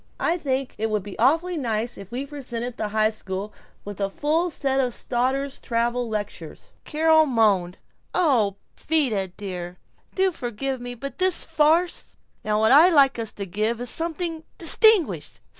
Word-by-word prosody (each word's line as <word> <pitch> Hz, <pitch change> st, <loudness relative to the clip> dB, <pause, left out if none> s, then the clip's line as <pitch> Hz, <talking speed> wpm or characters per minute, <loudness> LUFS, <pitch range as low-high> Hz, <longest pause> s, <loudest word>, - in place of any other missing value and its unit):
I 335 Hz, -, +1 dB
think 270 Hz, -3 st, -2 dB
it 220 Hz, +1 st, 0 dB
would 210 Hz, -2 st, -1 dB
be 205 Hz, -1 st, -10 dB
awfully 325 Hz, +8 st, +2 dB
nice 230 Hz, -2 st, -2 dB
if 195 Hz, +1 st, -11 dB
we 255 Hz, +3 st, -4 dB
presented 250 Hz, -4 st, -6 dB
the 215 Hz, -, -3 dB
high 215 Hz, +1 st, +1 dB
school 200 Hz, -1 st, -6 dB, 0.3 s
with 205 Hz, -1 st, -7 dB
a 195 Hz, -, 0 dB
full 310 Hz, -, 0 dB
set 270 Hz, -4 st, -1 dB
of 250 Hz, -3 st, 0 dB
Stoddard's 265 Hz, +3 st, -2 dB
travel 235 Hz, 0 st, -1 dB
lectures!" 210 Hz, -1 st, -6 dB
Carol 315 Hz, 0 st, +3 dB
moaned, 205 Hz, -8 st, +2 dB, 0.3 s
"Oh, 240 Hz, -, +2 dB, 0.2 s
but -, -, -20 dB
Vida 255 Hz, -12 st, +1 dB
dear, 180 Hz, -2 st, -7 dB, 0.4 s
do 380 Hz, 0 st, +2 dB
forgive 255 Hz, -2 st, -4 dB
me 245 Hz, 0 st, -6 dB
but 270 Hz, +2 st, -8 dB
this 370 Hz, -1 st, +2 dB
farce 325 Hz, +2 st, +1 dB, 0.3 s
Now 210 Hz, 0 st, 0 dB
what 220 Hz, 0 st, +3 dB
I'd 325 Hz, +6 st, +7 dB
like 275 Hz, -4 st, +4 dB
us 225 Hz, -2 st, -3 dB
to 200 Hz, -, -5 dB
give 215 Hz, +5 st, -2 dB
is 245 Hz, -1 st, -3 dB
something 330 Hz, 0 st, -3 dB
distinguished. 335 Hz, -, +4 dB
245 Hz, 165 wpm, -24 LUFS, 215-305 Hz, 0.4 s, I'd